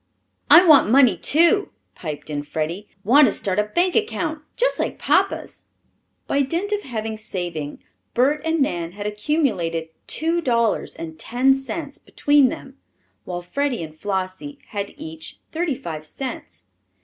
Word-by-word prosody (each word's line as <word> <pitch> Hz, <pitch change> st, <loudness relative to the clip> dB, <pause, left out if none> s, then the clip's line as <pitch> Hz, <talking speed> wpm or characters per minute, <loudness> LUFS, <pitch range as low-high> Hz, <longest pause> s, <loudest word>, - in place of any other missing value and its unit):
"I 350 Hz, +2 st, +9 dB
want 300 Hz, -9 st, +7 dB
money, 250 Hz, -4 st, +6 dB
too," 340 Hz, -, +3 dB, 0.2 s
piped 155 Hz, -2 st, -7 dB
in 145 Hz, -1 st, -2 dB
Freddie. 160 Hz, +7 st, -4 dB, 0.2 s
"Want 270 Hz, +7 st, +6 dB
to -, -, +2 dB
start 195 Hz, 0 st, -1 dB
a 210 Hz, -, +2 dB
bank 350 Hz, +11 st, +1 dB
account 345 Hz, -8 st, -1 dB, 0.2 s
just -, -, +1 dB
like -, -, -2 dB
papa's." -, -, 0 dB, 0.6 s
By 280 Hz, -, +1 dB
dint 340 Hz, +9 st, -1 dB
of 415 Hz, 0 st, 0 dB
hard 220 Hz, -, -4 dB
saving 175 Hz, -8 st, -5 dB, 0.3 s
Bert 280 Hz, +5 st, +3 dB
and 325 Hz, -1 st, 0 dB
Nan 170 Hz, -7 st, -3 dB
had 205 Hz, +1 st, -7 dB
accumulated 210 Hz, -, -1 dB, 0.2 s
two 330 Hz, +2 st, 0 dB
dollars 235 Hz, -6 st, +1 dB
and 160 Hz, -1 st, -8 dB
ten 255 Hz, +8 st, +3 dB
cents 280 Hz, +2 st, -5 dB
between 290 Hz, -3 st, +3 dB
them, 270 Hz, +2 st, -9 dB, 0.5 s
while 175 Hz, -1 st, -5 dB
Freddie 275 Hz, +1 st, -1 dB
and 155 Hz, -1 st, -9 dB
Flossie 190 Hz, -, -4 dB
had 200 Hz, -1 st, -4 dB
each 160 Hz, 0 st, -8 dB
thirty 325 Hz, -3 st, -1 dB
five 165 Hz, -, -6 dB
cents. 155 Hz, -, -7 dB
240 Hz, 150 wpm, -22 LUFS, 175-295 Hz, 0.6 s, I